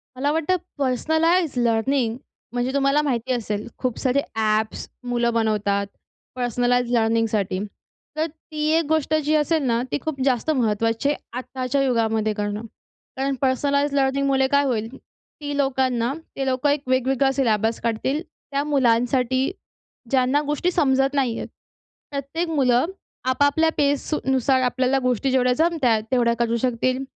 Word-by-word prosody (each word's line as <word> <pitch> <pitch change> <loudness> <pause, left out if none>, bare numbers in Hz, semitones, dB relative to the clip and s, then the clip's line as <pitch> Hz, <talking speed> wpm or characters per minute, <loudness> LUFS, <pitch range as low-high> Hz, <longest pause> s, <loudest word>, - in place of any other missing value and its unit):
मला 280 +3 0
वाटतं 325 +4 +1 0.2
personalise 315 +5 +1
learning 235 +1 +1 0.4
म्हणजे 245 +2 -1
तुम्हाला 280 +1 +3
माहिती 260 -4 -1
असेल 215 -3 -3
खूप 255 -3 -2
सारे 270 +1 +1
ॲप्स 215 0 0 0.2
मुलं 240 -1 +1
बनवतात 210 -3 0 0.5
पर्सनलाइज्ड 245 0 +1
लर्निंगसाठी. 225 -4 +1 0.6
तर 315 - +1
ती 310 -1 -6
एक 330 - +1
गोष्ट 315 -1 +1
जी 310 +1 +2
असेल 305 0 +1
ना, 235 -2 +1
ती - - +1
खूप 300 -4 -4
जास्त 260 +2 +1
महत्त्वाची 225 -1 +1
आहे 290 - 0 0.2
आत्ताच्या 255 +1 -2
युगामध्ये 225 -4 +1
करणं. 205 0 -3 0.6
कारण 270 0 0
पर्सनलाईज्ड 280 +2 +1
लर्निंगमुळे 270 0 +2
काय 285 0 +4
होईल, 225 -5 -1
ती 290 -1 -9
लोकांना 260 -3 +1 0.2
ते 270 - -2
लोकं 260 +2 +1
एक 285 0 +1
वेगवेगळा 265 +1 +2
सिलेबस 225 -4 +1
काढतील. 235 +6 -1 0.3
त्या 280 +1 0
मुलांसाठी 260 0 +2 0.6
ज्यांना 265 +2 +2
गोष्टी 295 +5 0
समजत 270 -4 +2
नाही 260 -5 0
आहेत. - - -5 0.6
प्रत्येक 280 +5 -3
मुलं 255 -5 +3 0.4
आपापल्या 285 +5 +3
फ़ेजनुसार 270 -2 +1
आपल्याला 255 +1 +1
गोष्टी 255 +1 0
जेवढ्या 250 -1 +3
जमत 320 +1 +1
आहेत, 220 -3 +3
तेवढ्या 240 -2 +3
करू 235 -1 +1
शकतील. 255 +2 0
260 Hz, 135 wpm, -23 LUFS, 235-280 Hz, 0.6 s, काय